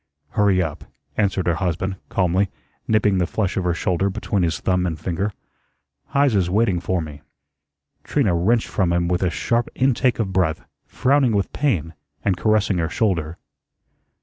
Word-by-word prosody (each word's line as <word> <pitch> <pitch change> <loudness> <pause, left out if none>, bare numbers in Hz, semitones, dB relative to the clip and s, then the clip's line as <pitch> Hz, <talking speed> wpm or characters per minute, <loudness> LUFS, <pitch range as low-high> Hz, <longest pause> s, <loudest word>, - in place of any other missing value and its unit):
"Hurry 100 -1 +2
up," 80 -3 -5 0.3
answered 100 -3 0
her 85 - +2
husband, 95 +2 -2
calmly, 95 +1 +1 0.4
nipping 105 -3 +3
the 90 - +1
flesh 100 -1 -1
of 95 - -1
her 85 -1 +1
shoulder 90 +3 0
between 100 0 -1
his 85 -2 0
thumb 90 -1 +1
and 80 -2 -4
finger. 95 +5 -2 0.8
"Heise's 115 -11 +2
waiting 95 -2 +2
for 90 0 -1
me." 75 -2 -9 0.8
Trina 125 -11 +1
wrenched 110 +7 +2
from 90 -4 0
him 85 0 +1
with 90 0 0
a 90 - +2
sharp 115 +8 0
intake 130 -1 +2
of 95 -5 -2
breath, 85 -4 0 0.2
frowning 135 -3 +2
with 100 -1 -1
pain, 90 - 0 0.3
and 95 - +2
caressing 105 -1 +1
her 80 -1 0
shoulder. 85 -7 -1
95 Hz, 160 wpm, -22 LUFS, 85-105 Hz, 0.8 s, nipping